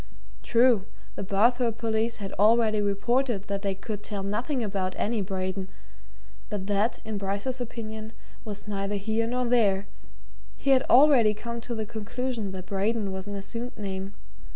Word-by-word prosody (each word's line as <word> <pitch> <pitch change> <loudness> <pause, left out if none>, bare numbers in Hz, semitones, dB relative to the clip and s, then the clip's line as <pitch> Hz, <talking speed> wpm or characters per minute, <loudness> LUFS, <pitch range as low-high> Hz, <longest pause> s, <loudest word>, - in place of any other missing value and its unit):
True, 235 -4 +4 0.3
the - - -5
Barthorpe 230 +4 +2
police 225 0 0
had 195 -2 -6
already 215 0 +5
reported 210 +2 +1
that 200 -1 -3
they 195 -1 -1
could 210 +1 -5
tell 205 -1 -4
nothing 235 +6 -1
about 195 -3 -2
any 220 0 0
Braden, 190 0 -3 0.8
but 200 -2 -3
that, 205 +3 +1
in 215 -2 -3
Bryce's 200 +7 -2
opinion, 220 -2 -6 0.3
was 210 -2 -6
neither 200 0 -2
here 220 +3 0
nor 250 +1 0
there 210 -5 +3 0.7
he 275 - +1
had 260 -1 +6
already 250 -6 +7
come 235 +2 -5
to 235 +1 -4
the 220 -1 -2
conclusion 225 0 -3
that 185 -1 -6
Braden 200 +2 0
was 190 +1 -5
an 205 - -4
assumed 230 +5 -5
name. 195 -1 -4
215 Hz, 155 wpm, -27 LUFS, 195-235 Hz, 0.8 s, already